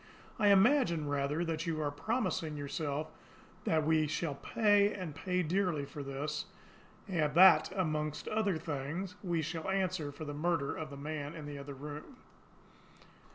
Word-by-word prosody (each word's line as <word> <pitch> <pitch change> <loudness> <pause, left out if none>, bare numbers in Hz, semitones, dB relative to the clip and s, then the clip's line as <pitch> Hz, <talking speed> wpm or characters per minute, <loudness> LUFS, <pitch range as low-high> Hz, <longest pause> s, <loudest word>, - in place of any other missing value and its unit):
I 210 - +4
imagine, 200 - +4
rather, 145 +3 0
that 165 +1 -2
you 160 -2 -1
are 145 -2 0
promising 165 - -1
yourself 145 +1 -3 0.5
that 155 -2 +2
we 155 -1 +3
shall 155 0 -1
pay, 205 +6 +3
and 180 -6 -5
pay 180 +3 -1
dearly, 175 -3 0
for 145 +1 -8
this 145 +2 -3 0.6
that, 170 -1 +6
among 155 -4 0 0.2
other 210 -5 +1
things, 160 +4 -4
we 170 -4 -1
shall 165 +3 -4
answer 185 -6 0
for 150 +2 -8
the 145 - -5
murder 155 -1 0
of 155 -1 -5
that 140 - -8
man 150 +1 -5
in 155 -2 -7
the 145 -1 -6
other 140 0 -7
room. 150 - -8
155 Hz, 155 wpm, -33 LUFS, 145-180 Hz, 0.6 s, that